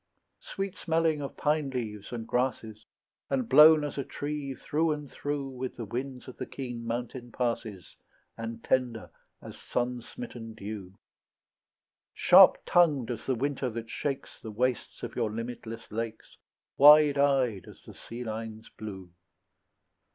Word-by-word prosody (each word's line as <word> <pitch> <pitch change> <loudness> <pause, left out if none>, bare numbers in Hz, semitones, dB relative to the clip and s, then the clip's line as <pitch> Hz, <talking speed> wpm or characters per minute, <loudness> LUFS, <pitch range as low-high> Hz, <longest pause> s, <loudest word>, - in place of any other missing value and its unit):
Sweet 195 -1 -5
smelling 160 -2 +1
of 140 - -6
pine 150 -1 +1
leaves 110 -6 -5
and 115 -2 -5
grasses, 115 -4 -2 0.4
And 260 -3 0
blown 155 -5 +8
as 145 -1 -4
a - - -1
tree 145 -1 -4
through 155 +4 0
and 150 -2 -8
through 145 -1 -3
With 130 0 -5
the 115 - -5
winds 125 +4 -5
of 130 - -10
the - - -5
keen 120 -3 -6
mountain 120 +1 -4
passes, 115 -6 -3 0.4
And 115 0 -6
tender 125 -4 0 0.3
as - - -10
sun 125 0 -2
smitten 115 - -9
dew; 100 -3 -7 1.2
Sharp - - +8
tongued 145 -9 +3
as 120 - -6
the 130 - +2
winter 135 +1 -1
that 115 -1 -6
shakes 140 -2 -4
The 110 - -7
wastes 125 +3 -2
of - - -5
your - - 0
limitless 115 0 -6
lakes, 115 0 -5 0.4
Wide 150 0 +8
eyed 130 -9 +2
as - - -14
the - - -12
sea 120 +1 -8
line's 110 -1 -6
blue. 95 -4 -9
125 Hz, 145 wpm, -29 LUFS, 115-145 Hz, 1.2 s, blown